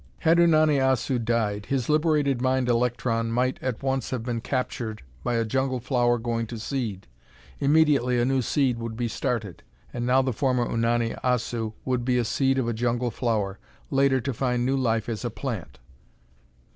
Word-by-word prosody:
Had 165 +2 +4
Unani 155 -4 +4
Assu 130 -2 +1
died, 105 -3 -1
his 130 -4 -1
liberated 150 -4 +2
mind 130 -1 +1
electron 120 -1 0
might 125 +2 0
at 130 -1 -3
once 135 -1 -1
have 125 -3 -3
been 120 -1 -3
captured 120 - -3 0.2
by 120 - 0
a 115 0 +1
jungle 130 +2 0
flower 120 -1 +1
going 115 0 -2
to 115 - -6
seed. 110 -4 -4 0.5
Immediately 140 -4 +3
a 120 - +2
new 135 0 +2
seed 125 -1 +1
would 115 -1 -5
be 120 -1 -1
started. 110 -6 -3 0.3
And 120 0 -3
now 130 +1 +4
the 130 -1 -1
former 125 +1 +1
Unani 115 0 0
Assu 120 -3 -1
would 125 -2 0
be 125 0 +1
a 120 - +1
seed 135 +3 +1
of 130 -3 0
a 120 - 0
jungle 120 +1 -1
flower, 105 -6 -1 0.3
later 135 -1 +3
to 135 +2 -3
find 125 0 0
new 135 +2 +1
life 115 -4 0
as 115 -1 -4
a 120 - -1
plant." 105 - -5
125 Hz, 180 wpm, -25 LUFS, 115-130 Hz, 0.5 s, Had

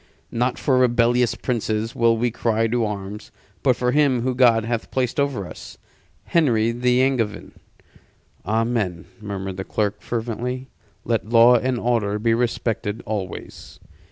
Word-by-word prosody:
Not 125 +2 0
for 130 -3 +2
rebellious 120 -1 +3
princes 110 -2 -2
will 115 -1 +3
we 120 +1 0
cry 115 -1 0
to 115 +1 0
arms; 105 0 -6 0.3
but 130 -3 +3
for 125 +1 0
him 140 -3 +3
whom 130 0 -1
God 115 -3 +4
hath 115 -1 -3
placed 130 +1 -1
over 140 -9 0
us - - -10 0.5
Henry 115 -9 +2
the 125 +1 +2
Angevin." 115 -6 -1 0.9
"Amen," 110 -4 -1 0.2
murmured 95 -2 -5
the 95 - -3
clerk, 105 0 -2
fervently. 120 +3 -4 0.4
"Let 115 -2 -1
law 120 +1 +7
and 125 +1 0
order 115 -4 0
be 115 +2 +1
respected 115 -2 -1
always." 100 -4 -6
115 Hz, 140 wpm, -22 LUFS, 110-125 Hz, 0.9 s, law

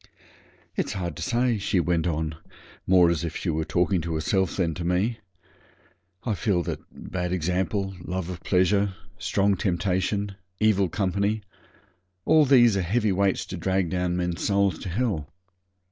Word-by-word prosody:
'It's - - -1
hard 85 -5 -3
to - - -8
say,' 120 -2 +1
she 95 -1 +1
went 85 0 +1
on, 80 -1 -1 0.5
more 90 -2 +6
as 85 -1 -1
if 80 -1 -3
she 90 - -1
was 80 0 -2
talking 90 0 +1
to 80 0 -3
herself 95 +4 0
than 85 -4 +1
to 85 - -5
me; 95 +7 0 1.0
'I 115 - 0
feel 100 -4 0
that. - - -4
Bad 90 -1 -4
example 90 +2 -1
love 90 -1 -3
of 90 -1 -6
pleasure 95 +1 +2 0.2
strong 100 +1 +2
temptation 95 +1 -1 0.2
evil 100 -4 +3
company 100 +2 0 0.8
all 155 -1 +5
these 120 -5 +6
are 95 - +1
heavy 105 +4 +1
weights 95 0 +1
to 95 - -6
drag 95 0 0
down 90 -1 0
men's 90 -1 -2
souls 100 -4 +2
to 95 - -6
hell. 90 - -1
95 Hz, 160 wpm, -26 LUFS, 85-100 Hz, 1.0 s, more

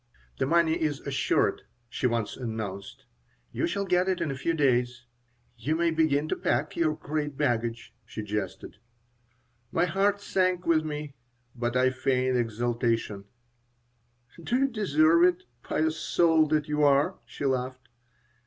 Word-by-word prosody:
"The - - +1
money 165 +1 +2
is 150 -3 0
assured," 140 -2 0 0.3
she 125 +2 -1
once 115 -3 -2
announced. 110 -5 -6 0.5
"You - - -1
shall 200 +3 -2
get 180 0 +2
it 185 - 0
in 165 -4 -1
a - - -4
few 165 +6 -1
days. 125 -4 +1 0.5
You 145 +7 0
may 170 0 +2
begin 155 -2 +1
to - - 0
pack 135 +6 -1
your 155 -2 +1
great 150 -2 -4
baggage," 120 -4 -1
she 110 - -7
jested 105 -2 -5 0.9
My 170 - +2
heart 195 +3 +1
sank 185 -2 0
within 155 -2 +2
me, 150 -1 -5 0.4
but 120 0 -1
I 130 0 +3
feigned 130 0 0
exultation 115 -3 -1 1.2
"Do 235 - -1
you 275 +1 +3
deserve 170 - +3
it, 180 0 +3 0.2
pious 160 +4 -1
soul 160 -2 +3
that 150 -1 0
you 150 0 0
are?" 140 -1 +3
she 130 +5 -6
laughed. 130 -1 -2
145 Hz, 145 wpm, -27 LUFS, 120-165 Hz, 1.2 s, I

